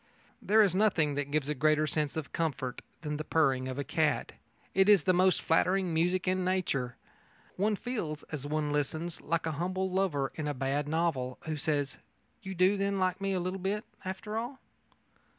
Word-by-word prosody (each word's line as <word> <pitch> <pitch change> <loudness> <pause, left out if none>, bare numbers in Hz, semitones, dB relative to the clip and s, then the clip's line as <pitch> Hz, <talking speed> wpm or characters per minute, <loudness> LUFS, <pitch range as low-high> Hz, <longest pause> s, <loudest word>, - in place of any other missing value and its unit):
There 215 +1 +5
is 195 -4 +3
nothing 185 -7 +3
that 145 0 -2
gives 145 -1 0
a 150 - +1
greater 155 +2 +3
sense 150 -1 -1
of 155 - -5
comfort 135 -6 -2 0.2
than 150 -1 -2
the 155 - -3
purring 135 -5 +2
of 130 0 -4
a 140 - -1
cat. 160 -1 0 0.4
It 190 +1 +4
is 200 -7 +7
the 185 - +4
most 185 0 +3
flattering 180 +2 +2
music 180 +3 +1
in 185 0 +1
nature. 170 -10 0 0.6
One 210 +3 +1
feels, 195 -10 -4
as 150 -4 -4
one 150 0 -1
listens, 155 +3 -2
like 165 +1 -1
a 160 - 0
humble 185 +4 -2
lover 180 -8 0
in 155 - -4
a 145 - -2
bad 135 +3 -1
novel, 150 -6 0
who 160 -1 -3
says: 145 -2 -1 0.4
"You 190 0 -6
do, 185 +3 +4
then, 200 0 0
like 185 0 0
me 195 0 0
a 185 - 0
little 185 +2 -3 0.4
after 200 +4 -4
all?" 245 +4 -5
160 Hz, 185 wpm, -31 LUFS, 145-185 Hz, 0.6 s, is